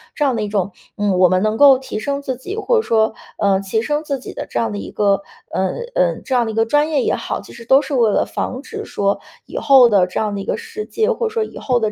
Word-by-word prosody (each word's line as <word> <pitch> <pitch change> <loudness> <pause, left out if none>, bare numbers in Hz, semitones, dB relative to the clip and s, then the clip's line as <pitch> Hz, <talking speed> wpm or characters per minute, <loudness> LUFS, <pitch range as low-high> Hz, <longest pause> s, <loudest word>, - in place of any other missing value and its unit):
这 295 - +1
样 265 -3 +1
的 225 - -2
一 210 - -2
种 200 -2 -1 0.3
嗯， 205 -2 +1
我 185 -1 +6
们 185 +1 +2
能 215 +1 0
够 275 -1 +7
提 260 -4 -6
升 280 +5 -2
自 260 -2 -2
己， 315 +11 -7
或 465 +2 +1
者 - - +3
说， 220 - +2 0.2
呃， 200 -2 +2
提 195 +3 -1
升 295 +4 -1
自 280 -3 -3
己 - - -9
的 - - -6
这 120 - -2
样 115 -2 0
的 105 - -4
一 95 - -7
个， 200 -1 +2 0.3
呃， 190 0 0 0.2
呃， - - +1
这 265 - -3
样 245 -1 +3
的 - - -2
一 - - -7
个 225 0 +3
专 295 +6 +2
业 290 -5 +1
也 - - +1
好， - - -4
其 - - -14
实 235 - -11
都 265 +4 +5
是 280 - -5
为 235 -4 +3
了 - - +2
防 255 - -4
止 430 +8 -7
说 200 0 -1 0.3
以 - - -8
后 265 -4 +6
的 195 -4 +4
这 180 - -3
样 210 -1 -1
的 200 - -3
一 - - -7
个 - - -1
世 455 -2 -7
界， 450 +2 0
或 470 0 -1
者 445 - -7
说 450 -1 +1
以 - - -9
后 250 -2 0
的 215 -2 0
235 Hz, 320 characters per minute, -19 LUFS, 205-290 Hz, 0.3 s, 够